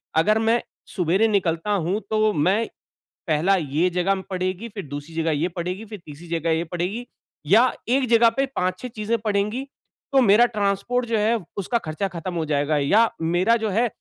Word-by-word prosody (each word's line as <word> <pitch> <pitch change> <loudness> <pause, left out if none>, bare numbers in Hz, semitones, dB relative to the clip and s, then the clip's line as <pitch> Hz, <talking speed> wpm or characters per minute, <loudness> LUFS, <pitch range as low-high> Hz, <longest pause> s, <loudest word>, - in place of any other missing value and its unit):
अगर 210 +7 +3
मैं 225 +2 +2 0.3
सुबेरे 190 +4 +1
निकलता 185 -3 0
हूँ, 195 0 0
तो 215 0 +2
मैं 190 +9 +1 0.6
पहला 165 +5 +3
ये 160 +1 0
जगह 185 +2 0
पड़ेगी, 185 +3 -3
फ़िर 200 -4 -7
दूसरी 145 +3 -8
जगह 165 0 0
ये 155 +3 0
पड़ेगी, 180 +4 -5
फ़िर 210 -1 -9
तीसरी 155 +3 -11
जगह 165 0 -2
ये 160 +1 +1
पड़ेगी 180 +8 -4 0.4
या 230 +9 +5 0.2
1 260 +1 +2
जगह 230 0 +6
पे 275 - +3
5-6 185 +7 -2
चीजें 225 0 -2
पड़ेगी 210 +3 -1 0.5
तो 270 - +6
मेरा 225 +1 +6
ट्रांसपोर्ट 220 +2 -1
जो 230 -1 0
है, 220 +2 +2 0.2
उसका 200 +4 0
खर्चा 175 -1 -3
ख़त्म 175 0 -6
हो 165 -2 -1
जाएगा। 150 0 0
या 210 +11 +4
मेरा 175 +7 +2
जो 220 -1 -2
है 230 +5 +2
195 Hz, 180 wpm, -23 LUFS, 170-225 Hz, 0.6 s, जगह